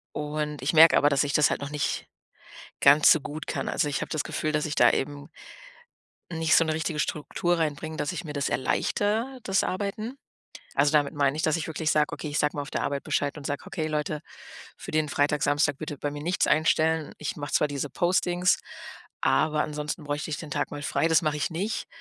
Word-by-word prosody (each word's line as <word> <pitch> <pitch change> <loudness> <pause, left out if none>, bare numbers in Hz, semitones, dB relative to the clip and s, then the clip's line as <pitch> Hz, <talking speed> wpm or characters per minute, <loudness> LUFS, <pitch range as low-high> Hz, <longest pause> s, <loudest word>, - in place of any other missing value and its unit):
Und 150 -1 -3
ich 140 +5 0
merke 160 +1 +8
aber, 145 - +4
dass 140 0 +2
ich 145 - -2
das 150 - +4
halt - - -2
noch 140 - -4
nicht 145 -1 -2 0.8
ganz 145 +2 +7
so 160 - +5
gut 150 +3 -7
kann. - - -3
Also, 150 - 0
ich 145 - -2
habe - - -5
das 155 - -1
Gefühl, 155 -1 -2
dass 150 0 0
ich 155 - -3
da 120 - +5
eben 145 +1 -3 1.0
nicht 160 -1 +2
so 165 - +4
'ne 155 - 0
richtige 160 -1 -2
Struktur 170 +4 -1
reinbringe, 155 0 -2
dass 150 +3 -2
ich 180 0 -5
mir 150 - -6
das 140 -1 -1
erleichter, 220 - -1
das 195 0 +1
Arbeiten. 215 +7 -3 0.6
Also, 145 +2 +3
damit 150 0 +2
meine 140 0 +1
ich, 160 - -2
dass 155 +1 +2
ich 165 - -4
wirklich 160 0 -1
sag, 150 -1 +2
okay, 155 - -5
ich 145 +1 -2
sage 150 -1 +1
mal 145 - -3
auf 140 - -9
der - - -2
Arbeit 140 -1 -2
Bescheid 145 +1 -1
und 140 - -7
sage: 145 -1 -3
„Okay, 155 -1 -3
Leute, 150 -1 -2 0.6
für - - -8
den 155 -1 +1
Freitag, 145 0 +1
Samstag 145 -1 +2
bitte 150 -2 -5
bei 145 - -3
mir 145 0 -7
nichts 175 +3 +1
einstellen. 155 +1 +2
Ich 150 - -4
mache 145 -1 -6
zwar - - +3
diese 145 0 -3
Postings, 180 +2 +1 0.6
aber 155 -1 +2
ansonsten 150 +1 -4
bräuchte 145 +1 -3
ich 150 - -2
den 155 - -8
Tag 145 0 -2
mal 145 0 -6
frei“, 165 - +1
das 160 +2 +4
mach 155 -1 +1
ich 150 - -1
nicht. 195 +7 -3
150 Hz, 225 wpm, -26 LUFS, 145-160 Hz, 1.0 s, merke